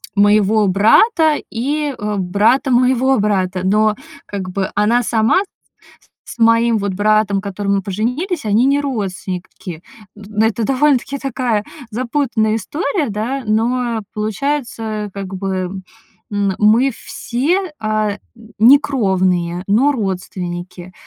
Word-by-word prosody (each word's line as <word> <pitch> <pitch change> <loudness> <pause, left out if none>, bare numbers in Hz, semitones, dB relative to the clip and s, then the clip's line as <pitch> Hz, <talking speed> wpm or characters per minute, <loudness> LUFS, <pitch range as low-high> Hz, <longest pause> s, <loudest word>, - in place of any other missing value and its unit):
моего 205 +1 +3
брата 300 - +4
и, 285 +4 -2
э, 210 0 -3
брата 205 +9 +2
моего 255 +1 +3
брата. 190 -3 0
Но 210 +3 +2 0.3
как 195 -2 -5
бы 190 +1 -2
она 215 +4 +3
сама 225 - +2
с - - -19 0.8
с - - -10
моим 230 0 +4
вот 200 -2 -2
братом, 205 0 +2
которым 200 0 -1
и - - -15
поженились, 250 - -2
они 215 +4 +3
не 280 +1 +2
родственники. 185 - -5 0.3
Ну 210 +1 -1
это 225 0 -1
довольно-таки 275 +1 +1
такая 245 -5 -1 0.3
запутанная 235 -2 0
история, 285 - -2
да, 240 +6 -3
но 230 +2 0
получается, 220 -2 -3
как 195 -1 -6
бы, 190 0 -3 0.5
м, 205 -1 0
м, - - -2
мы 225 +6 +4
все, 275 - -2
э, 335 - -12
н 215 -1 -1 0.4
не 245 +7 +7
кровные, 185 - 0
но 255 +8 +3
родственники, 180 -4 -5
215 Hz, 125 wpm, -17 LUFS, 200-255 Hz, 0.8 s, не